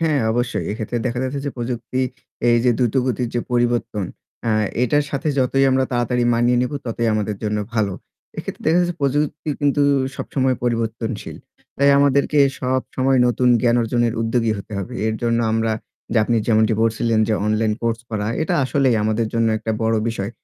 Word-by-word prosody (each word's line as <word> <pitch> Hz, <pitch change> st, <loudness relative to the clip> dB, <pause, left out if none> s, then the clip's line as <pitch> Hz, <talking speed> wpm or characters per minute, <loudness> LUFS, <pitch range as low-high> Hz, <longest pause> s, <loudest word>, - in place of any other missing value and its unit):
হ্যাঁ 155 Hz, -4 st, +2 dB
অবশ্যই। 120 Hz, +1 st, -1 dB
এক্ষেত্রে 110 Hz, +3 st, -3 dB
দেখা 120 Hz, 0 st, -2 dB
যাচ্ছে 130 Hz, +2 st, -3 dB
যে -, -, -1 dB
প্রযুক্তি 120 Hz, +1 st, -3 dB, 0.5 s
এই 120 Hz, -, +5 dB
যে 125 Hz, -, +5 dB
দ্রুতগতির 125 Hz, 0 st, 0 dB
যে 120 Hz, -, +1 dB
পরিবর্তন, 120 Hz, -4 st, 0 dB, 0.4 s
আ -, -, +2 dB, 0.3 s
এটার 145 Hz, +4 st, +2 dB
সাথে 140 Hz, +2 st, -2 dB
যতই 135 Hz, +1 st, +2 dB
আমরা 130 Hz, 0 st, +2 dB
তাড়াতাড়ি 120 Hz, 0 st, +1 dB
মানিয়ে 120 Hz, +1 st, +2 dB
নেব 125 Hz, -, -2 dB
ততই 115 Hz, 0 st, -1 dB
আমাদের 105 Hz, -1 st, -1 dB
জন্য 105 Hz, -1 st, -1 dB, 0.2 s
ভালো। 105 Hz, -3 st, +1 dB, 0.5 s
এক্ষেত্রে -, -, -6 dB
দেখা 165 Hz, +3 st, +4 dB
যাচ্ছে 175 Hz, 0 st, 0 dB
প্রযুক্তি 145 Hz, +2 st, -1 dB
কিন্তু 145 Hz, 0 st, +2 dB, 0.3 s
সবসময় 130 Hz, -1 st, 0 dB
পরিবর্তনশীল। 115 Hz, -2 st, -2 dB, 0.4 s
তাই 140 Hz, +1 st, +4 dB
আমাদেরকে 140 Hz, +1 st, +3 dB, 0.2 s
সবসময় 130 Hz, +1 st, 0 dB
নতুন 125 Hz, +1 st, +2 dB
জ্ঞান 120 Hz, 0 st, +3 dB
অর্জনের 120 Hz, 0 st, +1 dB
উদ্যোগী 115 Hz, 0 st, +1 dB
হতে 100 Hz, -, -10 dB
হবে। 110 Hz, +6 st, -5 dB
এর 110 Hz, -, 0 dB
জন্য 115 Hz, 0 st, +1 dB
আমরা 115 Hz, 0 st, +1 dB, 0.4 s
যে -, -, 0 dB
আপনি 120 Hz, +1 st, +1 dB
যেমনটি 110 Hz, -1 st, +3 dB
বলছিলেন 115 Hz, 0 st, +1 dB
যে 110 Hz, -, +2 dB
অনলাইন 110 Hz, 0 st, +1 dB
কোর্স 115 Hz, -1 st, 0 dB
করা 105 Hz, -2 st, -2 dB, 0.2 s
এটা 160 Hz, -, 0 dB
আসলেই 130 Hz, -3 st, +2 dB
আমাদের 110 Hz, +2 st, 0 dB
জন্য 115 Hz, -1 st, +2 dB
একটা 110 Hz, +1 st, -3 dB
বড় 110 Hz, 0 st, +2 dB
বিষয়। 105 Hz, -3 st, -3 dB
120 Hz, 170 wpm, -21 LUFS, 115-130 Hz, 0.5 s, এই